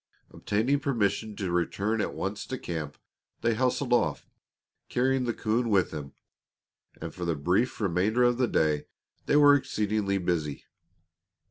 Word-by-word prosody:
Obtaining 120 +8 0
permission 110 -6 -1
to 95 -4 -3
return 100 +5 0
at - - -3
once 100 +1 -4
to 130 - -4
camp, 80 - -5 0.4
they 115 - +2
hustled 125 +2 0
off, 120 - +1 0.6
carrying 130 +1 +1
the 120 - 0
coon 115 +2 0
with 95 -4 +2
them, 70 -2 -7 0.9
and - - -6
for 90 - -6
the 85 -2 0
brief 90 - 0
remainder 100 +4 +1
of 120 0 +3
the 125 - +3
day 75 -7 +1 0.4
they - - +3
were 145 -1 +7
exceedingly 105 -7 0
busy. 85 -6 -2
105 Hz, 145 wpm, -28 LUFS, 90-125 Hz, 0.9 s, were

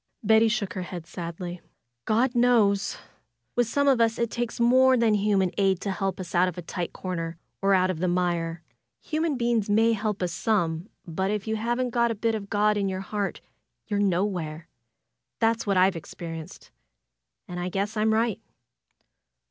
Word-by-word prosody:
Betty 220 +1 +5
shook 215 -3 -1
her 185 - -4
head 175 -2 -6
sadly. 175 +1 -6 0.4
"God 240 +4 +2
knows! 225 -5 +3 0.6
With 245 -2 +2
^ome 285 +4 +1
of 260 -4 +4
us 225 -1 +2
it 235 -1 -1
takes 240 -1 -3
more 255 +2 +5
than 230 -2 +3
human 200 -3 +2
aid 195 -2 +3
to 200 - -2
help 190 0 -2
us 180 -2 -7
out 180 +1 +4
of 180 - -5
a 175 - -5
tight 175 +1 -4
comer, 165 -3 -4 0.2
or 195 0 +4
out 185 0 +3
of 170 - -5
the 185 - 0
mire. 175 -2 -1 0.4
Human 315 -2 -1
be 240 -1 +1
ings 220 -3 +1
may 225 +2 +4
help 210 -2 -2
us 175 -1 -1
some; 180 -3 0 0.2
but 190 +3 -2
if 210 -1 -2
you 220 - 0
haven't 240 +3 -1
got 235 0 +2
a 230 - -1
bit 225 +2 0
of 205 -2 -4
God 210 0 +2
in 200 -1 0
your 190 0 -3
heart 200 0 -3 0.4
you're 205 -2 -1
nowhere. 175 -5 -1 0.7
That's 225 -1 +1
what 195 -2 +2
I've 185 0 +4
experienced, 165 0 -8 0.8
and 180 0 -5
I 175 +1 -2
guess 200 +4 -2
I'm 215 0 +2
right." 225 -1 +1
200 Hz, 185 wpm, -26 LUFS, 180-225 Hz, 0.8 s, Betty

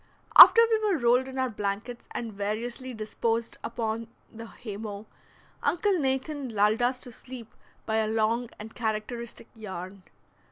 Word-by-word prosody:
After - - +11
we 445 -1 +2
were 415 -5 +1
rolled 250 0 +3
in 265 0 -8
our 260 -1 0
blankets 210 +4 -4
and 230 -2 -5
variously 230 +6 -4
disposed 225 +1 -3
upon 230 -1 -3 0.3
the 230 0 -9
haymow, 210 -2 -8 0.6
Uncle 375 +1 +1
Nathan 270 0 -2
lulled 215 +1 +2
us 250 +1 0
to 245 - -7
sleep 240 -1 -11 0.3
by 220 0 0
a 220 -1 +1
long 225 +2 0
and 220 +1 -10
characteristic 230 +1 -4
yarn. 190 -3 -8
230 Hz, 145 wpm, -27 LUFS, 215-255 Hz, 0.6 s, After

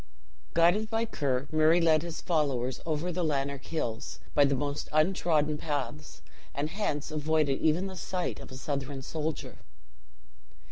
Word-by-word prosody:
Guided 175 +6 +4
by 225 0 +1
Ker, 140 - -1
Murray 155 +2 +5
led 160 -2 +4
his 170 -1 -5
followers 135 -7 0
over 160 +3 0
the 180 +1 -1
Lanark 140 -3 -1
Hills, 115 -9 -3 0.2
by 145 - +6
the 140 0 +2
most 145 +2 -3
untrodden 155 -2 +2
paths; 135 - -4 0.3
and 145 +3 -1
hence 155 -7 -2
avoided 155 -2 +1
even 160 +4 +2
the 190 -1 -5
sight 180 0 -3
of - - -10
a 130 - -7
Southron 135 -1 -3
soldier. 155 +1 -4
155 Hz, 145 wpm, -30 LUFS, 140-170 Hz, 0.3 s, by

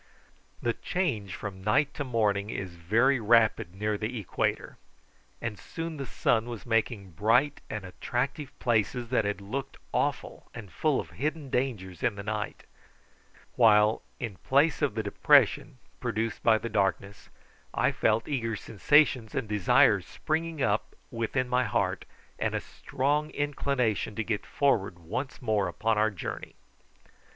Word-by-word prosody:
The 120 - +1
change 115 - -2
from 95 -2 -7
night 120 +8 +2
to 145 - -3
morning 105 -5 0
is 95 -4 -4
very 115 +11 +2
rapid 110 -5 +3
near 105 +1 -1
the 115 +2 -3
equator, 100 - -2 0.6
and 115 -4 -4
soon 165 -1 -6
the 135 -2 -5
sun 115 0 +1
was 115 -3 -7
making 115 -4 0
bright 120 - +2
and 105 -3 -5
attractive 125 +9 -3
places 120 0 0
that 120 -4 +2
had 105 0 -1
looked 130 +7 -5 0.2
awful - - -2
and 105 -6 -9
full 140 - +1
of - - -6
hidden 150 -1 -3
dangers 105 -9 -2
in 115 - +1
the 100 - -6
night; 105 0 -4 0.9
while, 105 -2 +5 0.2
in 110 -6 -5
place 145 - +2
of 145 - +1
the 110 - -1
depression 135 +4 +3 0.2
produced 115 -2 -2
by 110 -1 +5
the 115 - -4
darkness, 100 -1 -1 0.4
I - - +2
felt 110 +1 +1
eager 115 -6 -1
sensations 115 +2 +2
and 130 -5 -1
desires 105 -3 +4
springing 160 -2 -2
up 105 +1 0 0.2
within 115 +2 -1
my 125 0 +2
heart, - - -1 0.3
and - - 0
a - - +1
strong 145 +3 -1
inclination 135 -8 -1
to 110 - -1
get 105 -2 -3
forward 105 -11 +1
once 115 - -5
more 105 -4 +1
upon 110 +5 0
our 110 +1 +4
journey. 100 -5 -6
115 Hz, 145 wpm, -28 LUFS, 105-135 Hz, 0.9 s, while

